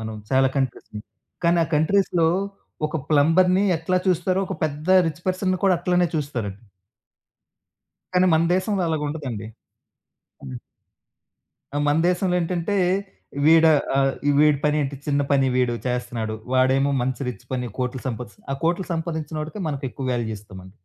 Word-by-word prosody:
మనం 110 0 -5 0.2
చాలా 130 0 +4
కంట్రీస్‌ని, 120 -5 -3 0.4
కానీ 170 +1 +4
ఆ - - -6
కంట్రీస్‌లో 170 +1 +2 0.6
ఒక 155 - -3
ప్లంబర్‌ని 180 +6 +4
ఎట్లా 165 +3 -1
చూస్తారో, 185 +1 +1
ఒక 190 -2 -5
పెద్ద 150 +2 -4 0.2
రిచ్ 160 +1 -5
పర్సన్‌ని 185 0 0
కూడా 185 -2 +4
అట్లానే 180 0 +2
చూస్తారండి. 120 -10 -4 1.5
కానీ 180 0 +4
మన 160 - +3
దేశంలో 190 +1 0
అలాగుండదండి. 145 -8 -3 1.0
హ్మ్. 65 -2 -7 1.2
ఆ! - - +1
మన 145 0 +3
దేశంలో 180 0 +1
ఏంటంటే, 175 +3 -1 0.7
వీడా 160 0 +7 0.2
ఆహ్, 135 0 +3 0.3
వీడి 150 -1 +5
పనేంటి, 150 -2 +1
చిన్న 145 -1 +1
పని 135 -1 +3
వీడు 125 -2 +1
చేస్తన్నాడు. 120 -3 -2 0.2
వాడేమో 135 +2 +3
మంచి 130 0 -2
రిచ్ 125 - -7
పని, 125 -1 -2
కోట్లు 125 0 -3
సంపాదిస్త్ 125 - -7
ఆ - - 0
కోట్లు 175 +3 0
సంపాదించినోడికే 160 +2 -4
మనకెక్కువ 135 -2 -4
వాల్యూ 110 -2 -2
ఇస్తామండి. 95 -1 -13
150 Hz, 130 wpm, -23 LUFS, 130-175 Hz, 1.5 s, వీడా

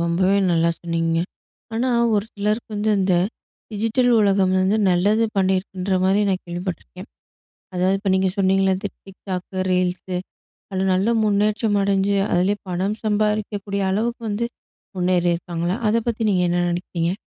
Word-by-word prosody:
ரொம்பவே 185 +4 +2
நல்லா 170 0 +3
சொன்னீங்கங்க. 165 -1 0 0.5
ஆனா, 245 +3 0 0.3
ஒரு 205 0 +1
சிலருக்கு 210 +3 -2
வந்து 210 +1 0
இந்த 185 -1 +2 0.6
டிஜிட்டல் 225 +4 +1
உலகம் 195 -2 +3
வந்து 190 +3 +2
நல்லது 205 +6 +3
பண்ணியிருக்குன்ற 190 0 0
மாரி 195 +2 +3
நான் 185 -1 -1
கேள்விப்பட்டுருக்கேன். 175 - -6 0.7
அதாவது, 185 +2 +2
இப்ப 200 -1 -2
நீங்க 190 0 +2
சொன்னீங்கள்ல, 195 0 +3
இந்த 205 +1 -4 0.2
TikTok, 190 -1 -6 0.3
ரீல்ஸு 180 0 -1 0.5
அதுல 190 0 -1
நல்ல 190 +4 +1 0.2
முன்னேற்றம் 210 +1 +1
அடைஞ்சு, 195 0 +1 0.2
அதிலேயே 190 +4 +2
பணம் 190 +4 -1
சம்பாரிக்கக்கூடிய 210 -1 -1
அளவுக்கு 235 +4 -1
வந்து 215 +3 -1 0.5
முன்னேறி 180 -1 +1
இருக்காங்களா? 170 +1 -3
அத 220 - +2
பத்தி 230 0 -2
நீங்க 180 -2 +2
என்ன 175 0 +1
நினைக்கிறீங்க? 175 0 -2
190 Hz, 135 wpm, -22 LUFS, 180-205 Hz, 0.7 s, நல்லா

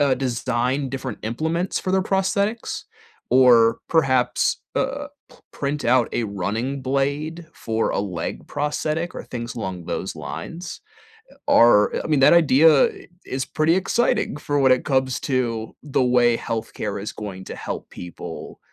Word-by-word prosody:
uh, 140 -2 +4
design 125 +1 -1
different 130 -3 -5
implements 160 - -1
for 185 - -3
their 190 - +3
prosthetics 200 +4 -1 0.5
or 115 -3 +6
perhaps, 130 -6 +2 0.2
uh, - - -1 0.2
p - - -19 0.2
print 145 +1 -3
out 120 0 +3
a - - 0
running 110 +7 -3
blade 145 +5 -2
for 115 -5 -2
a - - -1
leg 90 -5 -4
prosthetic 155 +3 -2
or - - -7
things 120 -1 -6
along 95 -5 -5
those - - -4
lines 170 +1 -7 0.7
are 115 -3 +6
I - - -5
mean, 155 -3 +2
that 135 - +7
idea 155 -2 +6
i - - -11 0.2
is 130 0 -3
pretty 155 +2 +1
exciting 190 -4 +1
for 145 0 -1
when 135 -1 +5
it 125 - +2
comes 130 -2 +1
to 115 -4 -2
the 140 -3 +1
way 120 -1 +4
health 115 -1 -4
care 105 -2 -4
is 105 - -5
going 95 -3 -7
to - - -7
help - - -6
people, 90 -1 -9
130 Hz, 155 wpm, -22 LUFS, 115-155 Hz, 0.7 s, that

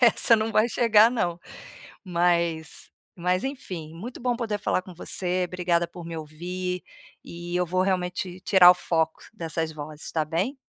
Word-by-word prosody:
essa 235 -1 +6
não 220 +1 -1
vai 215 +2 +4
chegar 225 -2 +5
não. 175 -9 -1 0.7
Mas 170 -3 0 0.3
mas 180 +1 0
enfim, 185 - -5
muito 225 +10 -8
bom 245 0 0
poder 225 -3 -2
falar 195 - 0
com 185 0 -12
você, 180 +1 -1
obrigada 175 -1 0
por 175 0 -10
me 165 -1 -6
ouvir, 180 +4 -5 0.4
e 175 +1 -7
eu 180 0 +2
vou 185 +2 0
realmente 180 -1 -1
tirar 185 -3 +7
o - - +4
foco 160 -2 -1
dessas 165 -4 -3
vozes, 150 0 -8
está 160 - -1
bem? 185 - -1
180 Hz, 165 wpm, -26 LUFS, 170-195 Hz, 0.7 s, tirar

